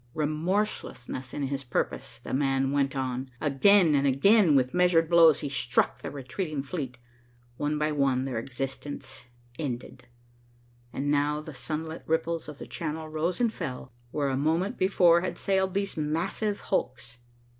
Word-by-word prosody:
Remorseless 155 - -1
in 130 +2 -5
his 140 0 -2
purpose, 120 - -3
the - - -8
man 135 0 +1
went 140 -1 +1
on. 130 0 -2
Again 165 +4 +4
and 140 -1 +3
again, 170 - +5
with 130 -1 +2
measured 180 -2 +4
blows, 165 -3 +6
he 145 - -2
struck 130 -2 +1
the - - -5
retreating 145 +2 -4
fleet. 140 -5 -5 0.6
One 150 +1 -1
by 150 +1 0
one, 135 -3 +1
their 125 -4 -2
existence 135 +2 -5 0.3
ended, 125 -3 -5 0.8
and 135 +4 -3
the - - 0
now 150 +1 +1
sunlit 155 +2 -5
ripples 160 0 -1
of 150 - -9
the - - -8
Channel 160 -1 -5
rose 160 +6 -1
and 235 -2 +2
fell, 130 - -6 0.2
where 140 +1 -1
a 135 - 0
moment 165 - 0
before 180 -3 +5
had 185 - -3
sailed 190 -1 0
these 200 0 -1
massive 170 +7 -1
hulks. 125 -8 -2
150 Hz, 155 wpm, -28 LUFS, 135-170 Hz, 0.8 s, blows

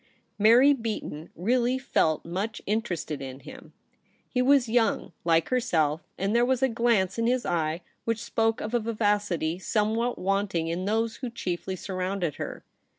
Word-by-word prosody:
Mary 240 +7 +7
Beaton 220 - -5
really 240 +7 +1
felt 160 - +1
much 195 +7 -3
interested 185 -9 -2
in 135 0 -7
him. 265 0 -12 0.6
He 250 - 0
was 265 -1 +4
MARY 220 - -5
BEATON. 240 -2 +5
71 - - -7
young, - - -17
like 165 -1 +3
herself, 165 - +1 0.2
and 200 +4 0
there 235 - +5
was 260 +1 +1
a 265 - +4
glance 230 -4 +1
in 230 - +1
his 250 0 +1
eye 160 0 -1 0.2
which 230 -1 -1
spoke 225 0 0
of 220 - -4
a 240 - +3
vivacity 205 -7 0
somewhat 225 +4 0
wanting 195 -3 0
in 175 +3 -2
those 220 +2 0
who 255 - -4
chiefly 185 -4 -4
surrounded 185 -3 -3
her. - - -6
215 Hz, 170 wpm, -27 LUFS, 175-235 Hz, 0.6 s, Mary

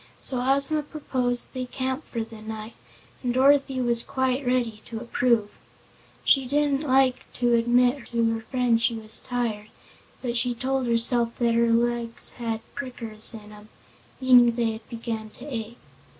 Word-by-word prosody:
So 255 -2 -3
Ozma 275 +4 +2
proposed 255 -5 -2
they 255 -1 -3
camp 260 +3 -3
for 230 -2 -3
the 225 -1 -11
night 220 +1 -7 0.5
and 245 - -1
Dorothy 270 0 +4
was 240 -2 +2
quite 260 0 -1
ready 245 -4 0
to 225 -2 -6
approve. 235 -2 +1 0.7
She 270 -2 +4
didn't 285 0 +1
like 265 -3 +2
to 240 -1 +1
admit 245 +2 +3
to 230 -1 +1
her 225 - -4
friend 240 -1 +1
she 230 0 +2
was 220 0 -2
tired, 230 -4 -3 0.6
but 240 -1 -1
she 245 0 +1
told 265 +1 -1
herself 235 0 +3
that 235 -1 +2
her 235 0 +3
legs 235 0 0
"had 225 -2 -4
prickers 230 -5 -3
in 210 -1 -11
'em," 210 0 -14 0.5
meaning 245 -2 +6
they 235 -2 +1
had 220 0 -10
begun 225 -2 -5
to - - -10
ache. 235 -4 -5
240 Hz, 160 wpm, -25 LUFS, 230-260 Hz, 0.7 s, meaning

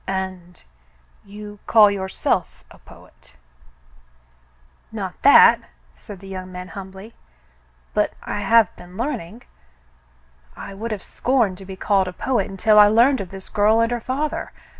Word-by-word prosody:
"And 185 -2 -5 0.3
— - - -35
you 205 0 -10
call 215 -3 +6
yourself 190 -1 -2
a - - -16
poet? - - -19 0.8
" - - -35 0.7
"Not - - -5
that," - - +7 0.3
said 195 - -12
the 195 - -12
young 185 -1 -8
man, 180 0 -8
humbly, 195 +3 -10 0.8
"but - - 0
I - - -4
have 215 +1 +3
been 180 +1 -14
learning. 235 - -5 1.1
I - - -8
would 220 +4 -6
have 210 -4 -5
scorned 230 -8 -1
to 195 - -11
be 190 0 -8
called 195 0 +1
a 180 - -6
poet 240 -1 -1
until 210 +2 +3
I 210 - +8
learned 235 +4 +3
of 185 - -8
this 195 0 -10
girl 215 +2 +2
and 230 +1 +1
her 240 -1 -2
father. 285 +6 -3
200 Hz, 155 wpm, -21 LUFS, 190-225 Hz, 1.1 s, I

